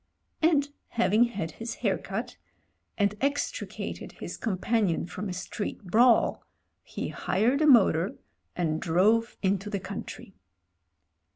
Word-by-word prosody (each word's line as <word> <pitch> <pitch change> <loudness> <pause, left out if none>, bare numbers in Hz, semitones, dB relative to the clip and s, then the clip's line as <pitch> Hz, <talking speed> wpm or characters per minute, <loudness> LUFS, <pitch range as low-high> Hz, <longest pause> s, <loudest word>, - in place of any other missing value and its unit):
And 310 -3 +3 0.2
having 215 +2 +3
had 200 -9 -4
his 225 +6 -6
hair 195 -2 +3
cut, 200 +6 -5 0.6
and 205 -1 +2
extricated 285 - -3
his - - -7
companion 205 -3 0
from 185 +3 -5
a - - -3
street 195 +3 -5
brawl, 230 +6 +4 0.4
he - - -5
hired 240 +9 +1
a 310 - +4
motor 205 - +5 0.4
and 160 -3 -1
drove 210 +7 +2
into 195 +1 0
the 200 -2 -2
country. - - -8
210 Hz, 120 wpm, -28 LUFS, 185-235 Hz, 0.6 s, motor